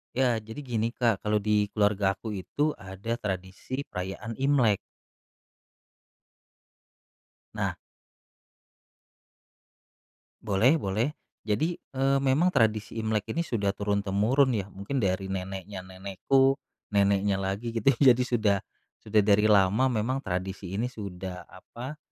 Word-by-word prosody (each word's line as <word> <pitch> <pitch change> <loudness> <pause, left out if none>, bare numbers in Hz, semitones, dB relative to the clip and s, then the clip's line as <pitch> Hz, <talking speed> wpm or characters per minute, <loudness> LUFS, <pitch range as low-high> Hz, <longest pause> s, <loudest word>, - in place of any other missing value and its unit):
Ya, 125 -2 +3
jadi 110 +5 -8
gini, 115 -5 -1
Kak. 115 -5 0
Kalau 105 0 +2
di 105 0 +1
keluarga 105 -2 +2
aku 105 +2 -6
itu 145 +11 -1
ada 95 +4 -5
tradisi 95 +3 -5
perayaan 95 +5 -5
Imlek. 125 -8 +4 2.8
Nah - - -1 2.7
Boleh 110 +6 +3
boleh. 110 +9 0 0.3
Jadi, 155 +11 0
eee, 135 +1 0
memang 140 +7 +3
tradisi 110 - +1
Imlek 110 -2 -1
ini 170 +1 -1
sudah 105 -8 0
turun-temurun 105 +6 +2
ya, 100 - -2
mungkin 100 +8 -4
dari 95 -1 0
neneknya 95 0 -5
nenekku, 100 +9 +1 0.4
neneknya 100 0 +3
lagi 100 +5 -2
gitu, 115 +4 +3
jadi 125 -3 +6
sudah 110 -5 +2 0.4
sudah 105 0 +3
dari 105 0 +4
lama 105 +4 +4
memang 125 +3 -1
tradisi 95 -1 -4
ini 115 - 0
sudah 95 -5 -7
apa, 120 +10 -9
105 Hz, 115 wpm, -28 LUFS, 95-125 Hz, 2.8 s, jadi